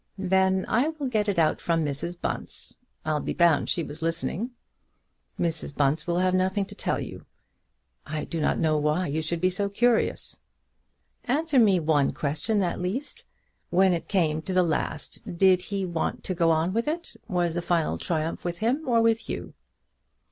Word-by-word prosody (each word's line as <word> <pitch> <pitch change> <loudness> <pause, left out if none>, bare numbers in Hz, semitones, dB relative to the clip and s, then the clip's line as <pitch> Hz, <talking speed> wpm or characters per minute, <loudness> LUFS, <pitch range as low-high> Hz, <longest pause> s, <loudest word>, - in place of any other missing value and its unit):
"Then 190 0 +2
I 245 +7 +2
will 315 -3 -4
get 215 -4 +1
it 200 - -1
out 160 -2 +2
from 165 -2 +1
Mrs. 150 +5 -3
Bunce. - - -4 0.3
I'll 155 -1 +1
be - - -3
bound 170 -5 +3
she 170 - 0
was 150 +1 -8
listening." 165 +7 -2 0.9
"Mrs. 165 -4 -1
Bunce 150 +2 +1
will 170 0 +1
have 185 0 +2
nothing 190 +2 +1
to - - -11
tell - - -1
you; - - -8 0.8
I 155 0 -4
do 165 -2 -3
not - - +2
know 155 -1 +2
why 150 +5 +1
you 155 0 -1
should 165 +2 -2
be 185 +2 +2
so 200 +2 -1
curious." 230 +3 +1 0.9
"Answer 290 +2 +2
me 200 -6 +5
one 150 -3 +2
question 190 +8 0
at 175 0 -2
least: 215 +11 -4 0.4
when 185 +1 +4
it 170 - -3
came 160 -6 +1
to 185 - -4
the 185 0 +4
last, 160 -3 -2 0.2
did 185 0 +5
he 195 0 -3
want 170 -3 -2
to 185 - -2
go 170 -2 +2
on 165 +3 +2
with 230 +4 0
it? 335 +3 -3
Was 175 -5 0
the 175 - -1
final 170 -2 0
triumph 165 -1 -2
with 175 -1 -3
him 245 - 0
or 230 -2 +4
with 225 -1 +1
you?" - - -5
180 Hz, 185 wpm, -26 LUFS, 160-200 Hz, 0.9 s, me